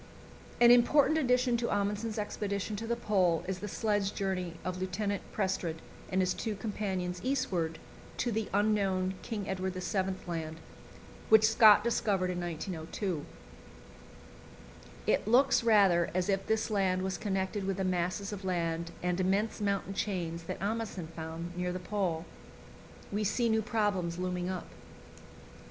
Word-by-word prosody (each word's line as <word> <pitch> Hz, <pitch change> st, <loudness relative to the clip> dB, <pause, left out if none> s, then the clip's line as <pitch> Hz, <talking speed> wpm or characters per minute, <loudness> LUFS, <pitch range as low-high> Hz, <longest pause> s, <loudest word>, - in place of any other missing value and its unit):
An 240 Hz, 0 st, +8 dB
important 285 Hz, +6 st, +5 dB
addition 250 Hz, -3 st, +2 dB
to 235 Hz, 0 st, -1 dB
Amundsen's 205 Hz, +2 st, -1 dB
expedition 205 Hz, 0 st, -2 dB
to 225 Hz, +2 st, -5 dB
the 235 Hz, -, +1 dB
Pole 185 Hz, -8 st, +2 dB
is 190 Hz, -1 st, -3 dB
the 210 Hz, -, -5 dB
sledge 205 Hz, -1 st, 0 dB
journey 185 Hz, -4 st, -2 dB
of 185 Hz, 0 st, -3 dB
Lieutenant 200 Hz, +2 st, -2 dB
Prestrud 190 Hz, -5 st, -1 dB, 0.4 s
and 190 Hz, 0 st, +2 dB
his 185 Hz, 0 st, +1 dB
two 220 Hz, -2 st, -3 dB
companions 190 Hz, -4 st, -3 dB
eastward 190 Hz, -12 st, -1 dB, 0.4 s
to 240 Hz, -, 0 dB
the 220 Hz, -1 st, -2 dB
unknown 195 Hz, -2 st, +1 dB
King 210 Hz, -4 st, -4 dB
Edward 190 Hz, -1 st, -2 dB
VII. 190 Hz, +1 st, -1 dB
Land, 160 Hz, -2 st, -4 dB, 0.7 s
which 220 Hz, 0 st, +7 dB
Scott 220 Hz, -2 st, +7 dB
discovered 200 Hz, -5 st, +1 dB
in 180 Hz, 0 st, -3 dB
1902. 170 Hz, 0 st, -4 dB, 1.8 s
It -, -, +1 dB
looks 250 Hz, +2 st, +4 dB
rather 195 Hz, -7 st, +5 dB
as 185 Hz, +1 st, 0 dB
if 195 Hz, 0 st, 0 dB
this 220 Hz, 0 st, 0 dB
land 190 Hz, -3 st, +1 dB
was 190 Hz, -1 st, -2 dB
connected 195 Hz, 0 st, -1 dB
with 195 Hz, -1 st, -1 dB
the 190 Hz, -, -1 dB
masses 185 Hz, +2 st, -1 dB
of 200 Hz, -1 st, -7 dB
land 170 Hz, -2 st, -1 dB
and 180 Hz, 0 st, 0 dB
immense 200 Hz, +4 st, +1 dB
mountain 200 Hz, -1 st, -1 dB
chains 170 Hz, -5 st, -3 dB
that -, -, -5 dB
Amundsen 205 Hz, -5 st, -3 dB
found 165 Hz, +2 st, -6 dB
near 180 Hz, 0 st, -1 dB
the 180 Hz, -, -3 dB
Pole. 180 Hz, -3 st, -2 dB, 0.9 s
We 210 Hz, +1 st, 0 dB
see 235 Hz, +3 st, +1 dB
new 220 Hz, 0 st, +3 dB
problems 205 Hz, -7 st, 0 dB
looming 180 Hz, 0 st, -2 dB
up. 185 Hz, -2 st, -4 dB
195 Hz, 145 wpm, -31 LUFS, 180-215 Hz, 1.8 s, An